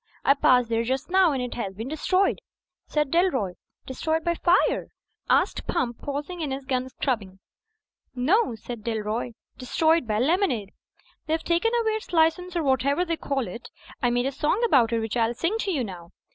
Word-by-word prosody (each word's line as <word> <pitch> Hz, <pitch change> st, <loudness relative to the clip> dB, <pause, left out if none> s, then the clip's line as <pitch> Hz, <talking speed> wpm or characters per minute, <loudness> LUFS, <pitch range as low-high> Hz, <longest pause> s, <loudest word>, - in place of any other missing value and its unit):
"I 275 Hz, -, +7 dB
passed 250 Hz, -4 st, +3 dB
there 230 Hz, 0 st, +1 dB
just 260 Hz, +7 st, -2 dB
now; 375 Hz, -3 st, +5 dB
and 265 Hz, -3 st, -1 dB
it 250 Hz, -, -4 dB
has 195 Hz, -5 st, -4 dB
been 225 Hz, +4 st, -5 dB
destroyed," 370 Hz, +6 st, +1 dB, 0.5 s
said 300 Hz, -3 st, 0 dB
Dalroy. 330 Hz, -, +1 dB, 0.3 s
"Destroyed 315 Hz, +5 st, -2 dB
by 340 Hz, -, +1 dB
fire?" 350 Hz, +2 st, +2 dB, 0.4 s
asked -, -, +2 dB
Pump, 245 Hz, -9 st, -1 dB
pausing 290 Hz, +5 st, -4 dB
in 300 Hz, -, -2 dB
his 270 Hz, 0 st, -4 dB
gun 255 Hz, -1 st, -1 dB
scrubbing. 215 Hz, -9 st, -3 dB, 0.8 s
"No," 275 Hz, -, +2 dB
said 225 Hz, 0 st, -8 dB
Dalroy, 225 Hz, +1 st, -2 dB, 0.3 s
"destroyed 315 Hz, +3 st, +2 dB
by 210 Hz, -1 st, 0 dB
lemonade. 260 Hz, -, +1 dB, 0.6 s
They've 320 Hz, +1 st, 0 dB
taken 345 Hz, +7 st, +1 dB
away 445 Hz, -1 st, +1 dB
its 435 Hz, -1 st, -5 dB
license 345 Hz, +2 st, +2 dB
or 335 Hz, -, 0 dB
whatever 280 Hz, +4 st, +2 dB
you 335 Hz, -2 st, -1 dB
call 275 Hz, -6 st, -2 dB
it. 230 Hz, +6 st, -8 dB, 0.3 s
I 245 Hz, -, +3 dB
made 245 Hz, +1 st, +1 dB
a 270 Hz, -, 0 dB
song 305 Hz, -, 0 dB
about 250 Hz, -, +4 dB
it, 230 Hz, -1 st, +1 dB
which 225 Hz, +1 st, -3 dB
I'll 235 Hz, 0 st, +1 dB
sing 355 Hz, -, -1 dB
to 400 Hz, -, -1 dB
you 285 Hz, -8 st, 0 dB
now 180 Hz, -5 st, -8 dB
270 Hz, 185 wpm, -25 LUFS, 235-335 Hz, 0.8 s, I